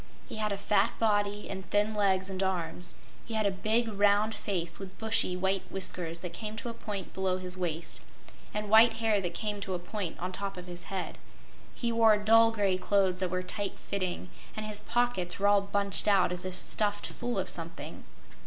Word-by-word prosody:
He - - -6
had 215 -1 0
a 200 - -1
fat 205 +2 +2
body 205 -2 +1
and 190 -2 -6
thin 210 +1 +2
legs 190 -2 +2
and 190 -1 -3
arms. 180 -2 -1 0.3
He 225 - -5
had 215 -1 +1
a 200 - +3
big, 220 +5 +1
round 205 +1 +3
face 170 -6 -3
with 190 -1 -8
bushy, 220 -5 +2
white 190 +1 +1
whiskers 175 -3 -1
that 180 -2 -5
came 215 +3 -5
to 235 +2 -5
a - - -4
point 205 -4 -6
below 190 -1 0
his 185 0 -3
waist, 170 -2 -3 0.5
and 210 0 -3
white 225 +2 +7
hair 220 -2 +1
that 175 -2 -3
came 210 -2 -3
to 190 -2 -2
a - - 0
point 180 0 -5
on 180 +1 -3
top 195 0 -4
of 180 - -7
his 175 0 -8
head. 190 -2 -4 0.6
He 235 -1 -1
wore 225 -2 +5
dull 225 +2 +6
gray 200 -4 +1
clothes 190 -1 +2
that 185 -1 +1
were 185 +1 -1
tight 195 +2 -3
fitting, 185 -2 -3 0.3
and 215 - -3
his 210 -1 -2
pockets 240 -8 0
were 200 - 0
all 205 0 +5
bunched 200 0 -1
out 195 -4 +4
as 180 0 -4
if 185 -1 -3
stuffed 205 -1 +1
full 240 -2 -3
of 190 -1 0
something. 170 -1 -5
200 Hz, 205 wpm, -30 LUFS, 185-215 Hz, 0.6 s, white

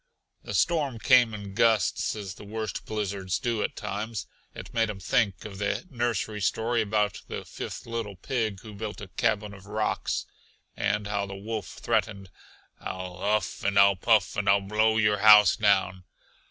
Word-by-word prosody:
The - - -6
storm 150 -8 +1
came 120 0 +5
in 100 -2 -7
gusts 115 -1 +2
as 100 -4 -6
the - - -13
worst 110 +1 -5
blizzards 100 -3 -2
do 115 +2 -1
at - - -2
times. 110 +1 -4 0.3
It - - -9
made 115 -1 +1
him 100 -2 -5
think 95 0 0
of 100 -2 -8
the 100 - -1
nursery 115 -4 -2
story 115 +4 +1
about 105 -2 0
the - - -6
fifth - - -7
little 115 -3 -4
pig 110 0 -2
who 110 -2 -10
built 105 +1 -6
a 100 - -9
cabin 105 +1 -1
of 95 0 -13
rocks, 105 +1 -1 0.5
and 105 0 0
how 100 -1 -2
the 100 - -7
wolf 105 0 -5
threatened: 105 -4 -2 0.5
"I'll 90 -1 -6
huff 105 +2 -1
and 100 0 +1
I'll 100 0 +7
puff, 105 0 +2
and 105 -1 0
I'll 100 0 +5
blow 110 +2 +2
your 105 -2 +3
house 105 -2 +8
down!" 95 -4 +2
105 Hz, 170 wpm, -27 LUFS, 100-110 Hz, 0.5 s, house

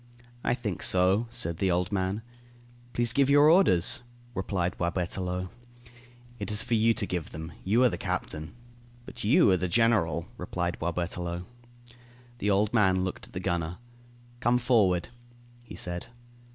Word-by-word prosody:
"I - - +1
think 105 -8 -4
so," 95 +5 +4
said 85 -7 -2
the 95 - +1
old 90 +1 0
man. 100 +2 -1 0.7
"Please 120 -1 0
give 140 -1 +3
your 145 +2 +7
orders," 140 - +3 0.3
replied 95 -2 -2
Boisberthelot. 90 +1 -2 0.9
"It 100 - -4
is 105 +1 +3
for 120 - -2
you 115 0 +3
to - - -1
give 90 -5 -4
them, 80 +2 -7
you 110 +6 +3
are 125 - +6
the - - -5
captain." 80 +6 -4 0.5
"But - - -9
you 105 -1 +5
are 95 - +4
the 90 +1 -1
general," 90 -6 +2
replied 90 0 -3
Boisberthelot. 85 +1 -3 1.0
The 105 - 0
old 105 +2 +2
man 95 -5 +3
looked 95 - -5
at - - -20
the 90 - -3
gunner. 85 -2 -2 0.6
"Come 120 0 +3
forward," 105 -8 +2 0.5
he 120 - -11
said. 90 +3 -3
95 Hz, 150 wpm, -28 LUFS, 90-115 Hz, 1.0 s, your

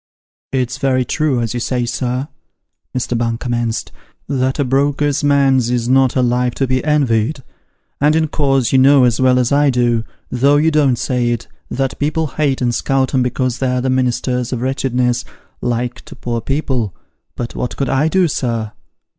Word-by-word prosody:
"It's 130 -2 -1
very 130 -2 +1
true, 140 -2 0
as 115 -2 -2
you 120 - -2
say, 125 0 -1
sir," 125 +2 -2 0.7
Mr. 125 0 -1
Bung 115 0 -1
commenced, 120 -2 -2 0.4
"that 130 -1 0
a 145 - +1
broker's 140 +2 +1
man's 135 -4 +3
is 120 -1 0
not 130 0 +3
a 130 - +2
life 125 0 +1
to 135 - 0
be 130 0 -1
envied; 135 -3 +1 0.6
and 150 +2 +3
in 160 -1 +2
course 135 -5 +1
you 130 - +5
know 135 0 +6
as 120 0 +2
well 130 -1 +4
as 125 0 +1
I 145 0 +4
do, 120 -3 +1 0.3
though 140 +3 +3
you 160 +2 +3
don't 145 -5 +3
say 125 -1 0
it, 120 -1 -2 0.2
that 135 0 -2
people 155 +2 0
hate 140 -2 -1
and 120 -1 +1
scout 135 +1 0
'em 130 - +3
because 125 0 -1
they're 125 -1 0
the 130 +1 0
ministers 125 -1 0
of 125 -3 -2
wretchedness, 125 -2 0 0.4
like, 120 0 -2
to - - -11
poor 120 -1 -3
people. 130 - -2 0.4
But 120 - -5
what 125 - -4
could 135 - -1
I 135 +3 +2
do, 185 +2 +3
sir 115 -7 -2
130 Hz, 180 wpm, -17 LUFS, 120-140 Hz, 0.7 s, know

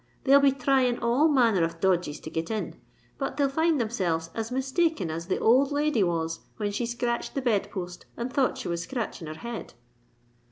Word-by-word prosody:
They'll 275 +1 +7
be 280 0 +5
thrying 260 -2 +2
all 245 +6 +3
manner 235 - +3
of 165 0 -2
dodges 175 -5 +1
to 155 - -8
get 160 0 -3
in: 220 -2 -4 0.4
but 270 0 -3
they'll 285 -1 +3
find 320 +2 +2
themselves 180 -8 -1
as 225 +1 -4
mistaken 265 - 0
as 165 +2 -5
the 190 - 0
old 265 +5 +4
lady 290 -5 +1
was 165 -2 0 0.2
when 205 -2 -1
she 230 +4 -2
scratched 235 0 -2
the - - +1
bed 220 -6 +1
post 180 -3 -7
and 240 +2 -4
thought 265 -1 +2
she 260 - -5
was 170 -1 -2
scratching 210 -4 -4
her 155 - -6
head." 235 +5 -7
235 Hz, 195 wpm, -27 LUFS, 175-265 Hz, 0.4 s, They'll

